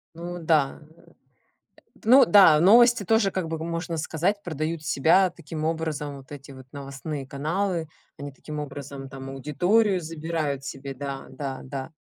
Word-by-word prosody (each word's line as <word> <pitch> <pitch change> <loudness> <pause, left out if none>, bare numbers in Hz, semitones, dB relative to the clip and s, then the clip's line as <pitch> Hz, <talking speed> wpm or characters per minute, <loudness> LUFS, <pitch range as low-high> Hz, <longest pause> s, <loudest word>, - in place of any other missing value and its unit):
Ну 175 +1 -6
да, 155 -4 +1 0.2
э. - - -21
Эт - - -24 0.9
ну 255 +4 +7
да, 190 -8 +7
новости 235 +4 +6
тоже 220 0 +2
как 185 -3 -3
бы, 160 0 -3
хм, 160 - -5
можно 165 0 -3
сказать, 170 +6 -1
продают 155 -1 -3
себя 160 +8 +4
таким 160 -2 -7
образом. 155 -3 -3
Вот 135 +1 -13
эти 140 0 -10
вот 130 -1 -12
новостные 140 0 -6
каналы, 165 +4 -2 0.3
они 145 0 -7
таким 150 +3 -8
образом 140 -1 -7
там 135 0 -8
аудиторию 180 - +1
забирают 155 -3 -3
себе, 140 0 -7
да, 135 0 -6
да, 135 0 -6
да. 135 +1 -6
155 Hz, 160 wpm, -25 LUFS, 140-175 Hz, 0.9 s, ну